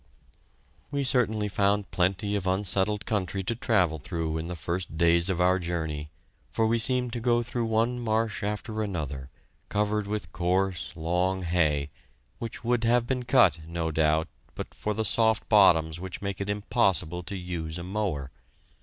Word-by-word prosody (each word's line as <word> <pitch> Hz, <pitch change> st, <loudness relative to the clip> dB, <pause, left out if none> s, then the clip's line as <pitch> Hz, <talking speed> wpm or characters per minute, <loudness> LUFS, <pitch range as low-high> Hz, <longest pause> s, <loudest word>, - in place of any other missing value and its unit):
We 140 Hz, -1 st, -1 dB
certainly 110 Hz, -5 st, +2 dB
found 100 Hz, 0 st, +1 dB
plenty 95 Hz, +3 st, 0 dB
of 95 Hz, -2 st, -2 dB
unsettled 100 Hz, +2 st, +1 dB
country 95 Hz, -2 st, -1 dB
to 115 Hz, -, -1 dB
travel 90 Hz, -9 st, +1 dB
through 80 Hz, +2 st, -3 dB
in 80 Hz, -, -5 dB
the 90 Hz, -, -4 dB
first 85 Hz, +1 st, -4 dB
days 85 Hz, +2 st, +4 dB
of 90 Hz, -2 st, -1 dB
our 90 Hz, +1 st, +3 dB
journey, 80 Hz, -4 st, -3 dB, 0.4 s
for 110 Hz, -, +1 dB
we 115 Hz, +1 st, +2 dB
seemed 125 Hz, +1 st, +2 dB
to 120 Hz, -, -2 dB
go 120 Hz, 0 st, +2 dB
through 120 Hz, 0 st, -2 dB
one 115 Hz, +2 st, +1 dB
marsh 110 Hz, -2 st, 0 dB
after 105 Hz, +2 st, -3 dB
another, 75 Hz, -10 st, -4 dB, 0.4 s
covered 105 Hz, 0 st, 0 dB
with 105 Hz, 0 st, -4 dB
coarse, 90 Hz, +1 st, 0 dB
long 90 Hz, +3 st, 0 dB
hay, 75 Hz, -5 st, +1 dB, 0.5 s
which 115 Hz, 0 st, -6 dB
would 120 Hz, -1 st, +1 dB
have 120 Hz, +1 st, +3 dB
been 125 Hz, 0 st, -2 dB
cut, 120 Hz, -, +4 dB
no 85 Hz, -1 st, -2 dB
doubt, 80 Hz, +1 st, +2 dB, 0.3 s
but -, -, -6 dB
for 105 Hz, 0 st, -3 dB
the 110 Hz, +1 st, -1 dB
soft 110 Hz, +1 st, +2 dB
bottoms 85 Hz, -6 st, +5 dB
which 95 Hz, -1 st, -6 dB
make 100 Hz, -1 st, -4 dB
it 100 Hz, -, -3 dB
impossible 100 Hz, -5 st, +1 dB
to 95 Hz, +3 st, -6 dB
use 85 Hz, -3 st, -4 dB
a 85 Hz, -, -6 dB
mower. 90 Hz, -8 st, -2 dB
95 Hz, 165 wpm, -27 LUFS, 85-110 Hz, 0.5 s, bottoms